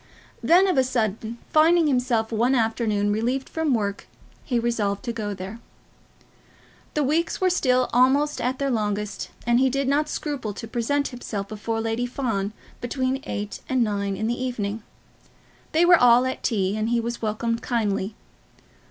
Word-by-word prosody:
Then, 360 +3 +5
of 360 -7 +2
a - - +5
sudden, 225 -2 -2 0.2
finding 330 +2 +5
himself 250 -5 +1
one 235 +4 +2
afternoon 220 -3 +1
relieved 245 +5 -1
from 320 -5 0
work, 200 -3 -3 0.4
he 245 - -1
resolved 220 -4 -1
to 235 - -2
go 210 -3 -3
there. 195 +4 -7 1.4
The 300 - +2
days 320 +4 0
were 370 -1 +3
still 255 -7 +2
almost 270 +4 +3
at 255 +2 -1
their 275 -1 -1
longest, 210 -2 -2 0.2
and 240 0 +3
he 265 0 +4
did 275 +1 -1
not 295 +2 +1
scruple 280 -11 -3
to 225 - -7
present 260 +5 0
himself 215 -5 -5
before 225 +2 -3
Lady 225 +2 -1
Fawn 225 -6 -2 0.3
between 260 +2 -1
eight 205 0 -4
and 260 -2 +2
nine 200 -2 -1
in 220 - -2
the 240 +3 -1
evening. 220 -4 -3 0.9
They 330 +2 +4
were 350 -3 +6
all 245 +1 +6
at 260 - -3
tea, 200 -4 0
and 215 +1 -1
he 240 0 +2
was 235 +1 -4
welcomed 230 +1 -1
kindly. 210 -3 -1
235 Hz, 165 wpm, -24 LUFS, 215-265 Hz, 1.4 s, were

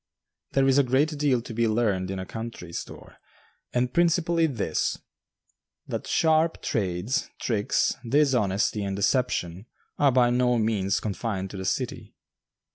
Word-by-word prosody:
There 135 0 +3
is 135 +1 +4
a - - +5
great 140 +5 +1
deal 140 -5 +1
to 115 - -8
be 115 +1 +1
learned 105 -5 0
in 95 - -3
a 95 - -5
country 110 -6 -7
store, - - -8 0.5
and 125 0 0
principally 170 -1 +2
this 115 - -1 0.9
that - - -5
sharp 160 0 +2
trades, 100 +1 -1
tricks, 105 -4 +1 0.2
dishonesty, 110 -8 +2
and 100 -1 -2
deception 100 -3 0 0.3
are 145 -2 +5
by 120 -1 +4
no 125 0 +2
means 105 -4 +1
confined 100 -2 -3
to 100 - -7
the 95 - -5
city. - - -3
115 Hz, 140 wpm, -26 LUFS, 100-135 Hz, 0.9 s, a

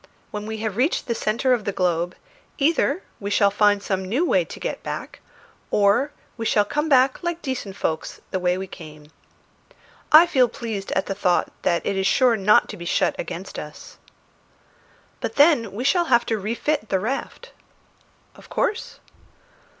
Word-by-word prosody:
When 210 0 -5
we 220 0 -4
have 210 -2 -3
reached 275 +8 +1
the 235 - -1
centre 230 +3 +1
of 235 -4 0
the 200 - -2
globe, 175 -2 -1 0.4
either 330 +5 +1 0.2
we 200 - -4
shall 205 -1 +3
find 205 0 +3
some 190 -1 -1
new 270 - +1
way - - +3
to - - -10
get - - -4
back, - - -6 0.5
or 210 +8 +3 0.3
we 225 - -4
shall 205 -1 +3
come 295 +8 -2
back 260 -1 +4
like 345 -1 -3
decent 250 -8 -4
folks 160 -5 -3
the 190 - -1
way 180 0 +1
we 190 - -4
came. 155 -4 -12 1.0
I 315 +3 +9
feel 260 -8 +3
pleased 220 -4 -5
at 190 - 0
the - - -3
thought 185 -3 +1
that 170 -2 0
it 200 - 0
is 190 0 +1
sure 255 -3 +4
not 210 0 +4
to - - -7
be 175 - -8
shut - - +1
against - - -6
us." - - -11 1.2
"But - - -4
then 285 - +4
we 220 +5 -5
shall 345 +6 +3
have 240 -5 +3
to 225 -2 -1
refit 230 +4 -2
the 190 - +1
raft." 270 - -4 0.8
"Of - - -17
course." 425 - -2
215 Hz, 175 wpm, -23 LUFS, 195-270 Hz, 1.2 s, I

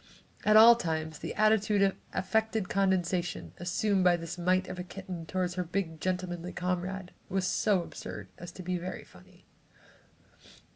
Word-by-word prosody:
At 215 0 +6
all 230 +2 +10
times, 160 -6 -3
the - - -5
attitude 215 -1 +3
of 195 -1 +2 0.2
affected 220 0 0
condescension 175 - 0
assumed 190 +2 +1
by 175 -1 +5
this 165 -1 -6
mite 185 +1 +1
of 180 - -6
a - - -3
kitten 180 -3 -7
toward 180 0 -1
her 180 0 -2
big 170 -2 -3
gentlemanly 180 -1 -3
comrade, 180 +1 -3 0.2
was 190 0 0
so 190 0 +2
absurd 105 - -8
as 175 0 -8
to 185 - -9
be 180 0 -2
very 185 +2 -6
funny. - - -19
185 Hz, 155 wpm, -30 LUFS, 175-195 Hz, 0.2 s, all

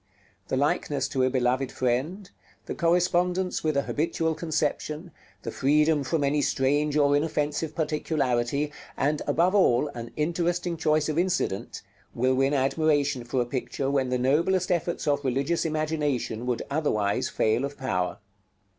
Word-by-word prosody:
The 130 - -1
likeness 140 0 0
to 130 - -1
a 130 - +3
beloved 130 0 0
friend, 135 +11 -1 0.4
the - - -4
correspondence 180 +2 +1
with 155 -2 +1
a 140 - +2
habitual 160 +2 -1
conception, 160 +1 -2 0.3
the 115 - -4
freedom 150 +3 +2
from 145 +3 0
any 145 +1 +2
strange 145 +3 +1
or 145 -1 +4
offensive 150 0 -1
particularity, 145 -3 0 0.3
and, 145 +2 0
above 170 +6 +2
all, 150 -8 +3
an 120 -4 -7
interesting 170 +2 -1
choice 155 -2 +1
of 155 +1 0
incident, 180 - -1 0.3
will 130 +2 +2
win 135 +2 +2
admiration 140 -1 +1
for 125 +1 0
a - - -8
picture 135 +2 -3
when 135 -2 +1
the 125 - +1
noblest 165 +9 +1
efforts 170 -1 -1
of 145 0 +1
religious 140 +7 0
imagination 150 -7 -1
would 125 -2 -1
otherwise 110 -10 0
fail 110 +4 +1
of 140 +1 -4
power. 90 -9 -2
145 Hz, 145 wpm, -26 LUFS, 130-160 Hz, 0.4 s, or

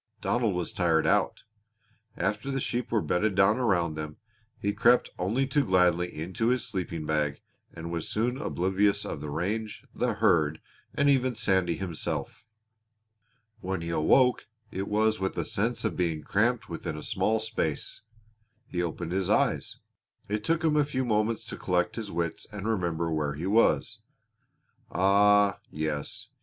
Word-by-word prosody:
Donald 115 -5 0
was 90 -2 -2
tired 85 -3 +2
out. - - +1 0.7
After 110 +5 -1
the 135 0 -1
sheep 125 -1 -2
were 110 -3 +2
bedded 100 +3 +1
down 100 +4 +4
around 90 -9 +1
them, 75 0 -6 0.4
he 100 0 -1
crept 120 +4 +4
only 110 +9 +1
too 140 +2 +1
gladly 90 -3 +3
into 90 +8 -3
his 125 -1 +2
sleeping 85 -6 -4
bag 75 -2 0 0.3
and 85 +1 -7
was 85 -2 -3
soon 125 +5 -1
oblivious 100 - +1
of 70 - -5
the 75 - -5
range, 105 +8 -3
the - - 0
herd, 80 -2 +2 0.4
and 140 - +2
even 130 -3 +3
Sandy 95 -5 +2
himself. 95 +5 -4 1.1
When 95 -1 -3
he 85 - -4
awoke 125 +11 +3 0.2
it 95 +1 -3
was 110 +1 +2
with 95 0 -2
a - - -1
sense 115 +2 -1
of - - -1
being 85 -4 -1
cramped 115 +4 +1
within 80 -2 -5
a 75 - -7
small 110 +1 +1
space. 110 -9 -3 0.6
He 90 -4 -3
opened 85 0 -3
his 95 0 0
eyes. - - +1 0.5
It 105 +1 -2
took 165 +6 0
him 155 -2 +3
a 150 - +5
few 130 -3 -2
moments 110 0 0
to - - -6
collect 90 -1 0
his 110 -3 -5
wits 85 -1 -3
and 105 0 -5
remember 85 -6 -1
where 75 -2 -1
he 80 +4 -5
was. 110 +4 +2 0.9
Ah, 100 +2 +4
yes! 75 -1 -3
95 Hz, 160 wpm, -28 LUFS, 85-110 Hz, 1.1 s, a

